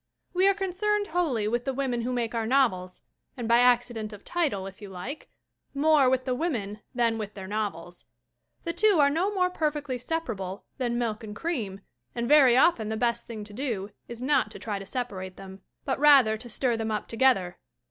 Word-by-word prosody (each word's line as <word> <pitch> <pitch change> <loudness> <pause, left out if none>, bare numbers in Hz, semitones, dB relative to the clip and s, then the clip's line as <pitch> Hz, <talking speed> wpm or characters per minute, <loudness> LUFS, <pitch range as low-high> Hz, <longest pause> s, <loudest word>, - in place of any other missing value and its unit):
We 375 +2 +4
are 395 - +4
concerned 410 +2 0
wholly 300 -11 0
with 240 +2 0
the 270 0 -2
women 255 -3 -1
who 245 +2 -2
make 240 -2 -2
our 225 -1 -1
novels 205 -9 +1 0.4
and, 240 -2 -4
by 235 +1 +5
the - - +5
accident 240 -3 +2
of 205 -1 -12
title 285 - -1
if 195 +1 -10
you 205 - -8
like, 195 - -7 0.5
more 290 -2 +4
with 255 0 +1
the 255 - 0
women 235 - -2 0.2
than 230 -2 +1
with 210 -1 -6
their 190 -2 -7
novels. 190 -4 -4 0.6
The 335 - -2
two 410 +2 +4
are 285 -1 +5
no 355 +7 +1
more 365 -3 +1
perfectly 295 -6 -2
separable 220 - -4
than 240 -2 0
milk 225 -3 -2
and 210 -1 -7
cream 215 - -3 0.3
and 235 0 -2
very 270 -4 +6
often 250 -7 +3
the 220 - -2
best 235 0 0
thing 220 -3 -6
to 205 0 -12
do 215 -5 -3 0.2
is 235 +1 -7
not 275 -5 +2
to - - -9
try 205 -3 -4
to 195 - -9
separate 195 -8 -5
them, 190 0 -11 0.2
but 265 -1 -1
rather 275 -7 +6
to 240 +3 -9
stir 240 +1 0
them 225 -1 -3
up 215 -1 -2
together. 225 -7 +2
240 Hz, 205 wpm, -27 LUFS, 210-285 Hz, 0.6 s, very